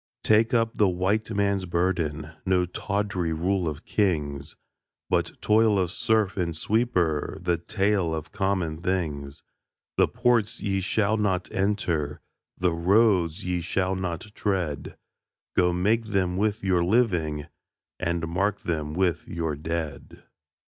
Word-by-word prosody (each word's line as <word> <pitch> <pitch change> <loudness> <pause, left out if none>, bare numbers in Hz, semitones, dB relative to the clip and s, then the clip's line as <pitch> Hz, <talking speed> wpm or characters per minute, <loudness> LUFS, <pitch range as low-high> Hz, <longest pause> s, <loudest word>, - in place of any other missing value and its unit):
Take 110 +2 +4
up 115 -2 +2
the 105 -3 +4
White 95 +5 0
Man's 100 -3 0
burden 85 -3 -1
No 90 -2 +2
tawdry 100 -1 -2
rule 90 +2 0
of 75 0 -8
kings, 75 -8 -1 0.6
But - - 0
toil 110 -1 +4
of 90 -3 0
serf 105 -2 +1
and 85 -3 -1
sweeper 90 -6 0
The 85 -1 0
tale 95 -3 0
of 80 0 -6
common 90 -5 -1
things. 75 -6 -2 0.5
The - - +5
ports 120 -3 +1
ye 95 -2 -1
shall 110 +3 +1
not 95 -4 0
enter, 90 -7 0 0.4
The 90 -2 +1
roads 95 0 +3
ye 90 -1 -1
shall 95 +2 0
not 90 -2 -3
tread, 90 -10 -2 0.6
Go 90 0 +4
make 105 +6 +1
them 95 -4 0
with 105 +2 0
your 90 -3 +2
living, 85 -8 +1 0.5
And 85 -1 -1
mark 100 +4 0
them 75 -2 -3
with 90 -3 0
your 80 -3 -2
dead. 80 0 -5
90 Hz, 135 wpm, -26 LUFS, 85-100 Hz, 0.6 s, The